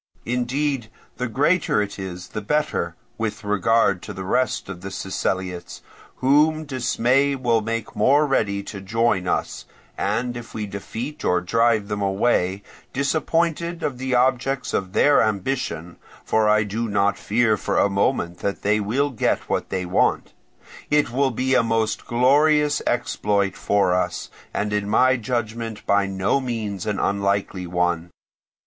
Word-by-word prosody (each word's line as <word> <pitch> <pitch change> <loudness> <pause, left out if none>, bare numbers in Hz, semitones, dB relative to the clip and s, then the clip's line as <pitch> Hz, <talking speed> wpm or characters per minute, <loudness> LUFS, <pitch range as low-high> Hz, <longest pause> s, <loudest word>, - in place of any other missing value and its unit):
Indeed, 125 +1 -1 0.3
the 125 - -2
greater 140 +5 +2
it 105 -1 -3
is 90 -1 -6
the 105 - -5
better, 150 +8 -1 0.2
with 110 -1 -3
regard 105 -1 +2
to - - -7
the 95 - -6
rest 125 +7 0
of 95 -2 -7
the 95 - -6
Siceliots, 95 -2 -3 0.3
whom 155 +4 +3
dismay 130 +1 +1
will 120 -4 +1
make 115 0 -4
more 145 +3 +4
ready 100 -8 0
to 100 -1 -7
join 105 -2 +1
us; - - -2 0.3
and 120 0 -1
if 120 -1 -9
we 110 -1 -2
defeat 110 +8 -6
or 90 - +2
drive 110 +3 +2
them 105 0 -3
away, 100 -1 +1 0.3
disappointed 165 +4 0
of 130 -3 -2
the 130 -1 -1
objects 125 +1 +1
of 95 0 -2
their 145 0 +5
ambition 100 -5 -2 0.3
(for 110 -1 +2
I 105 0 +4
do 110 +3 -3
not 100 0 +2
fear 110 +1 +2
for - - -2
a - - +4
moment 100 -3 0
that 100 -1 -3
they 105 +1 +2
will 130 +8 0
get 120 - 0
what - - -2
they 90 -1 -2
want), 90 - +1 0.6
it 150 -4 +2
will 135 +2 +2
be 130 +2 -1
a 125 - +5
most 115 -1 -1
glorious 145 +5 +3
exploit 100 -5 0
for 100 -3 +2
us, 90 - -2 0.2
and 105 0 -2
in 105 -1 -1
my 130 +4 +4
judgment 115 -2 -3
by 100 0 +2
no 95 +7 0
means 110 -7 -4
an 105 -2 -1
unlikely 100 -2 -1
one. 90 -1 0
110 Hz, 155 wpm, -23 LUFS, 100-130 Hz, 0.6 s, their